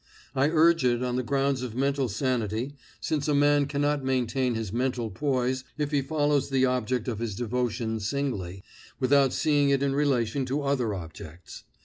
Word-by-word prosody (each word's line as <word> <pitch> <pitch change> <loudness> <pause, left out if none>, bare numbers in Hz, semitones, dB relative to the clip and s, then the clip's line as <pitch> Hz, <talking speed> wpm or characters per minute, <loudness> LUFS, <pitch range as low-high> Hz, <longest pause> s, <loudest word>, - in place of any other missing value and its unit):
I 135 +2 +3
urge 165 0 +4
it 120 -1 +2
on 125 -1 -1
the 130 - +1
ground 135 +1 0
of 120 -3 -5
mental 135 0 0
sanity, 120 +1 -1 0.3
since 150 -2 -2
a 150 - +2
man 145 0 +4
cannot 145 0 0
maintain 130 -1 0
his 110 -3 -4
mental 120 -2 -1
poise 130 +1 -1
if 150 -1 -2
he 145 -2 +2
follows 145 0 0
the 130 -1 +3
object 125 -1 -1
of 115 -4 -2
his 115 -4 -3
devotion 115 -1 -2
singly, 105 -6 -3 0.4
without 135 +1 +4
seeing 145 -2 +2
it 140 0 +2
in 140 -1 +1
relation 135 -3 +1
to 140 +3 -1
other 130 -7 0
objects. 80 -1 -10
130 Hz, 170 wpm, -27 LUFS, 120-140 Hz, 0.4 s, urge